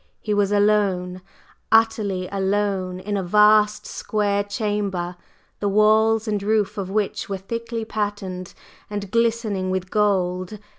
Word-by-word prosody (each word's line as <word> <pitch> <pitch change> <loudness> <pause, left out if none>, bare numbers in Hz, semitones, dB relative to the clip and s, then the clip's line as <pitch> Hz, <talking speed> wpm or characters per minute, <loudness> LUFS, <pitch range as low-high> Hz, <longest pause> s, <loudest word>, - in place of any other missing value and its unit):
He 210 - -2
was 205 -1 +2
alone 200 -3 +1 0.5
utterly 215 -5 +2
alone 195 -2 -1
in 205 +2 -3
a - - 0
vast 210 +2 +4
square 205 -1 -1
chamber, 200 -4 -2 0.4
the 205 - 0
walls 220 +2 +3
and 210 -2 -1
roof 210 0 +1
of 190 -2 -4
which 205 0 -2
were 195 - -2
thickly 230 +3 -5
patterned 205 -4 -4 0.3
and 205 -2 -5
glistening 225 -5 0
with 185 0 -3
gold. 185 -2 0
205 Hz, 130 wpm, -22 LUFS, 190-215 Hz, 0.5 s, vast